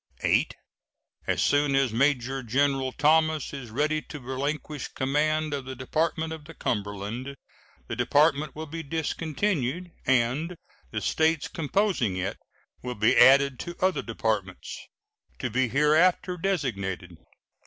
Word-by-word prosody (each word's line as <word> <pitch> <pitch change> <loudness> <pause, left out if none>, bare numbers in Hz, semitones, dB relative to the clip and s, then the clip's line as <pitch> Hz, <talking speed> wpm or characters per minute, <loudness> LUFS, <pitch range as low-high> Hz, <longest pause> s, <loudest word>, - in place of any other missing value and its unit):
VIII. - - +3 0.8
As - - +1
soon 145 -1 +3
as 135 -4 +2
Major 135 +1 +1
General 135 +2 +1
Thomas 155 +1 +2
is 135 -4 -7
ready 155 +6 0
to 150 - -9
relinquish 140 +2 -3
command 150 +3 0
of 140 -2 -3
the 130 0 -6
Department 160 +5 -1
of 155 -2 -9
the 165 +1 -12
Cumberland, 105 +5 -3 0.5
the - - -4
department 150 0 +2
will 155 +1 -5
be 165 +2 -6
discontinued, 160 +1 -2 0.2
and 135 +7 +1 0.3
the 110 - -3
States 160 +3 +1
composing 165 - 0
it 95 +1 -3 0.4
will 125 0 -4
be 110 +4 +3
added 135 +1 +6
to 175 - -6
other 185 0 +2
departments, - - -3 0.6
to 125 -4 -3
be 130 +3 +2
hereafter 155 - +3
designated. 100 - -2
140 Hz, 130 wpm, -27 LUFS, 125-160 Hz, 0.8 s, added